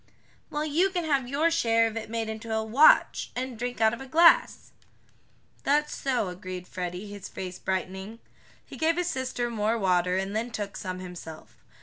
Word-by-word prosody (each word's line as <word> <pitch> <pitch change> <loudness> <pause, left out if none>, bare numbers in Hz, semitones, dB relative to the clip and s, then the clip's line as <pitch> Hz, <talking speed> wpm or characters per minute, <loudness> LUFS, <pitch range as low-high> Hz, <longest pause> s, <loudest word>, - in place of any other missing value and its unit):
"Well, 300 +1 -2
you 330 +6 +2
can 360 -2 -2
have 275 -5 +1
your 300 +6 +1
share 230 -8 +3
of 225 -1 -3
it 225 -1 -5
made 225 -1 -2
into 220 +1 -6
a 220 0 0
watch, 245 +8 +5
and 255 0 -3
drink 245 +1 -4
out 220 0 +4
of 235 - -6
a 270 - -8
glass." 335 - +4 0.9
"That's 300 +2 +1
so," 250 -8 -1
agreed 180 0 -7
Freddie, 180 +1 -5
his 205 -1 -8
face 185 -1 -7
brightening. 190 +3 -3 0.5
He - - -11
gave 325 +1 +1
his 355 0 0
sister 255 -2 -2
more 220 +1 0
water, 180 -2 +2
and 195 +2 -2
then 230 +2 -1
took 205 -3 -5
some 185 -1 -5
himself. 175 -3 -10
225 Hz, 185 wpm, -27 LUFS, 190-270 Hz, 0.9 s, watch